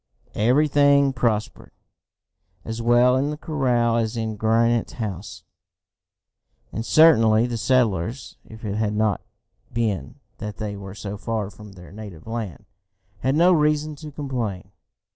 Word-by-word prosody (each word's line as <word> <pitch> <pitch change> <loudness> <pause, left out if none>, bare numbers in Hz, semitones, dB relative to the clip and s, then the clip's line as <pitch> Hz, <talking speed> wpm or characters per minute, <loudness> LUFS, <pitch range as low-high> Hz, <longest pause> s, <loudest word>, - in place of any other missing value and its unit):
Everything 140 +3 +3
prospered, 115 -4 -1 1.0
as 115 +1 -4
well 120 +2 +4
in 135 +2 +1
the 150 - -4
corral 125 -7 +1
as 115 0 -1
in 110 -1 -2
Granite 115 +2 +1
House 105 -4 -6 1.3
and 115 - -3
certainly 115 -6 +5
the 120 -1 -3
settlers, 115 -1 0
if 110 0 -12
it 105 0 -2
had 105 -1 0
not 105 -2 +1 0.5
been 110 -5 -2 0.2
that 105 -1 -6
they 105 -2 -4
were 100 -1 -9
so 100 0 -6
far 110 -2 -3
from 105 +1 -13
their 90 -2 -13
native 100 -6 -10
land, 110 -6 -5 0.5
had 130 +5 0
no 175 +3 +5
reason 150 -1 +1
to 155 +1 -9
complain. 125 -10 -4
115 Hz, 135 wpm, -23 LUFS, 105-130 Hz, 1.3 s, certainly